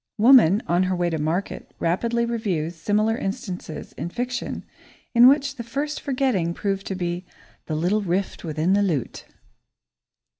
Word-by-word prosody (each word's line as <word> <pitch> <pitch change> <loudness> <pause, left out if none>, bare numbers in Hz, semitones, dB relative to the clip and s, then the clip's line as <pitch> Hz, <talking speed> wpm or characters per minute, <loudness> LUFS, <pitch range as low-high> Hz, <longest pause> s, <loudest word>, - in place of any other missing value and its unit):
Woman, 225 -4 +6
on 175 +1 +2
her 185 0 +1
way 175 -1 0
to 160 - -2
market, 160 +6 -3
rapidly 235 +8 0
reviews 190 -9 -2
similar 215 +6 +1
instances 185 -6 -5
in 170 - -5
fiction, 245 +5 -4 0.5
in 240 0 +8
which 280 0 +3
this 235 -1 -7
first 290 +5 -3
forgetting 255 - 0
proved 195 -1 -2
to 195 - -3
be 175 0 -3 0.4
"the 155 - -2
little 180 +7 +1
rift 190 0 -2
within 160 +2 0
the 205 - +3
lute." 165 - -2
195 Hz, 150 wpm, -24 LUFS, 175-235 Hz, 0.5 s, in